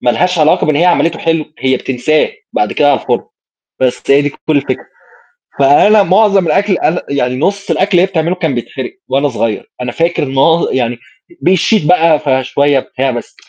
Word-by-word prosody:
ما 120 - +2
لهاش 180 +7 0
علاقة 155 -1 +2
بإن 155 -2 +1
هي 170 - +2
عملتُه 170 -2 +1
حلو، 165 -1 -1
هي 130 0 +1
بتنساه، 135 +4 0 0.2
بعد 105 - -1
كده 145 -1 +2
على 140 - +1
الفرن، - - -2 0.6
بس 125 -1 0
هي 140 +1 +5
دي 145 - 0
كُلّ - - -18 0.2
الفكرة، 140 - -2 0.7
فأنا 200 +10 +5
معظم 195 -1 +3
الأكل 195 +4 +1
أنا 170 +3 0
يعني 125 -3 -1
نُصّ 200 +7 -2
الأكل 195 +2 0
اللي 175 -2 +4
هي - - +4
بتعمله 175 -1 -1
كان 160 -7 -2
بيتحرق 125 - -6
وأنا 140 +2 0
صغير، 115 -4 -3
أنا 125 - -3
فاكر 165 +2 -1
معظ 140 +5 +1
يعني 120 -2 -1 0.4
بيشيط 185 0 +2
بقى، 165 -3 +3
فشوية 135 0 +1
بتاع 130 +1 -3
بس، 120 -1 -7
150 Hz, 180 wpm, -13 LUFS, 130-180 Hz, 0.7 s, هي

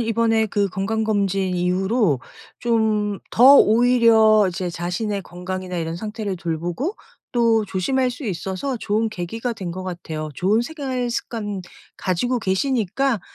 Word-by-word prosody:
이번에 225 -1 +2
그 200 -1 0
건강검진 195 -1 0
이후로 180 - +1 0.4
좀 220 -2 +1 0.3
더 260 +4 +8
오히려 225 -3 +5
이제 180 0 -3
자신의 185 +4 -3
건강이나 180 +1 -6
이런 165 0 -3
상태를 210 -1 -4
돌보고 175 - -3 0.4
또 230 -2 +3
조심할 250 +8 0
수 250 +3 -8
있어서 195 +7 -3
좋은 220 0 0
계기가 225 +7 -4
된 195 -6 -6
것 185 +2 -6
같아요. 160 -4 -5
좋은 200 - +2
생활 260 -4 -3
습관 205 -5 -4 0.4
가지고 245 +8 0
계시니까 230 +3 0
210 Hz, 290 characters per minute, -22 LUFS, 185-230 Hz, 0.4 s, 더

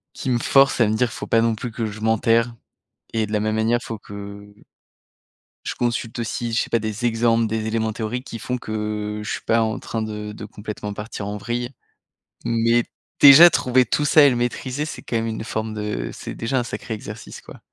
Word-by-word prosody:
qui 130 - -3
me 120 - +2
force 135 +1 +4
à 115 - +5
me 110 - +1
dire: 120 +3 +2
«Il - - -10
faut - - -6
pas 115 - +3
non 115 -1 +2
plus 120 +3 -5
que 110 0 -3
je 110 0 -7
m'enterre» 115 +1 +2 0.6
et 110 -1 +1
de 105 - -10
la 105 - +2
même 110 +1 0
manière 115 +2 +2
il - - -10
faut 115 - -5
que 100 0 -10 1.1
je - - -3
consulte 120 -1 -2
aussi, 115 +1 -3
je 115 - +2
sais - - -7
pas, 115 - +3
des 110 +2 -4
exemples, 115 0 +2
des 110 0 -2
éléments 110 0 -1
théoriques 120 +4 -4
qui 115 - -6
font 125 +2 -3
que 105 -1 -3
je - - -4
suis - - -3
pas 115 +1 +3
en 110 -1 -1
train 115 - -4
de 105 -1 -5
de 105 - -9
complètement 105 0 -6
partir 105 -1 -6
en 105 +1 -4
vrille 120 +3 -3 0.8
mais 115 +1 +2 0.4
déjà 150 +5 +10
trouver 130 -4 +2
tout 145 +6 0
ça 150 +1 +6
et 140 - +8
le 125 - 0
maîtriser 125 +4 -2
c'est - - -7
quand - - -5
même 115 - -1
une 110 0 -4
forme 110 -1 -3
de 105 - -3
c'est - - -7
déjà 125 +3 -1
un - - -1
sacré 110 -1 -5
exercice, 105 0 -8
quoi. - - -13
115 Hz, 225 wpm, -22 LUFS, 105-120 Hz, 1.1 s, déjà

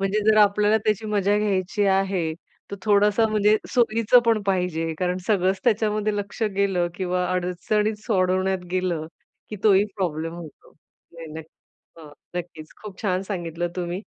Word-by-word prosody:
म्हणजे 195 +2 0
जर 215 - +3
आपल्याला 210 +1 +4
त्याची 215 0 0
मजा 205 -1 +1
घ्यायची 205 0 0
आहे, 190 -4 +1 0.4
तर 200 - -5
थोडासा 210 +1 +3
म्हणजे 215 0 +3
सोयीचं 230 -1 +4
पण 225 -2 +3
पाहिजे 180 -4 -1
कारण 180 0 0
सगळंच 190 -2 +1
त्याच्यामध्ये 215 -2 +1
लक्ष 205 +3 -5
गेलं 195 -3 +1
किंवा 180 -1 -1
अडचणीच 210 +4 -1
सोडवण्यात 185 -2 +1
गेलं 180 -4 -1 0.4
की 210 - -5
तोही 205 -1 +5
प्रॉब्लेम 165 -3 -2
होतो. 170 -3 -12 0.4
नाही 165 -1 -10
नक्क 160 0 -8 0.5
अ, - - -12 0.3
नक्कीच. 165 -3 -6
खूप 200 -3 -9
छान 185 -3 0
सांगितलं 175 -3 -4
तुम्ही 175 +1 -3
195 Hz, 145 wpm, -23 LUFS, 180-210 Hz, 0.5 s, तोही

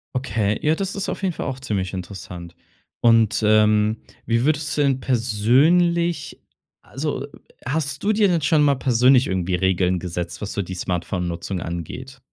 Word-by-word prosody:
Okay, 110 -5 -1
ja, 155 +1 +2
das 195 +2 -3
ist 200 -1 -3
auf - - -5
jeden 185 -2 0
Fall - - -5
auch 135 -1 -4
ziemlich 100 -8 -3
interessant. 90 -2 -8 0.5
Und, 115 -2 +4
ähm, 105 0 +3 0.3
wie 115 +2 +1
würdest 150 0 0
du 145 - +3
denn 135 -2 +1
persönlich 145 +9 +2 0.5
also, - - -4 0.4
hast 140 +1 -2
du 205 - +2
dir 210 -1 +3
denn 175 -3 +1
schon 150 +1 +3
mal 145 -1 +4
persönlich 125 0 +4
irgendwie 95 -1 -1
Regeln 90 0 +1
gesetzt, 85 -1 -5
was 105 - -4
so 100 - -1
die 95 0 -6
Smartphone-Nutzung 90 0 -3
angeht? 85 - -7
115 Hz, 160 wpm, -22 LUFS, 95-145 Hz, 0.5 s, Und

